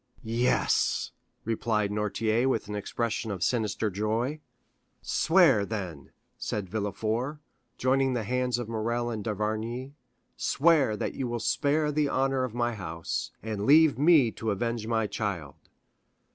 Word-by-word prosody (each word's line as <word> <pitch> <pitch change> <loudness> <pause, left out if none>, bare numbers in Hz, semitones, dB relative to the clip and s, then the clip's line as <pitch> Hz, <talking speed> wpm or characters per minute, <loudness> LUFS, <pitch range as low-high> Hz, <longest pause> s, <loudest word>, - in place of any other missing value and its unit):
"Yes," 115 +2 +1 0.3
replied 110 -2 0
Noirtier 110 +4 +1
with 115 -6 -1
an 105 - -5
expression 110 +2 -2
of 95 -3 -3
sinister 110 -2 0
joy. 110 +9 -1 0.6
"Swear, 160 - +4
then," 95 -9 -5 0.3
said 105 -3 -3
Villefort, 110 - -2 0.4
joining 130 +1 +2
the 120 -3 -1
hands 125 +2 0
of 120 -2 -4
Morrel 120 +2 -1
and 110 -2 -4
d'Avrigny, 110 +5 -3 0.4
"swear 145 -7 +3
that - - -3
you 130 - -3
will 120 0 -2
spare 150 +5 +1
the 150 -1 +1
honor 135 0 +1
of 125 -3 -4
my 120 0 0
house, 85 -5 -4
and 105 -2 -3
leave 155 -1 +6
me 150 -6 +5
to 110 - -4
avenge 115 +2 -2
my 110 -1 +1
child." 100 - -3
115 Hz, 135 wpm, -28 LUFS, 105-130 Hz, 0.6 s, leave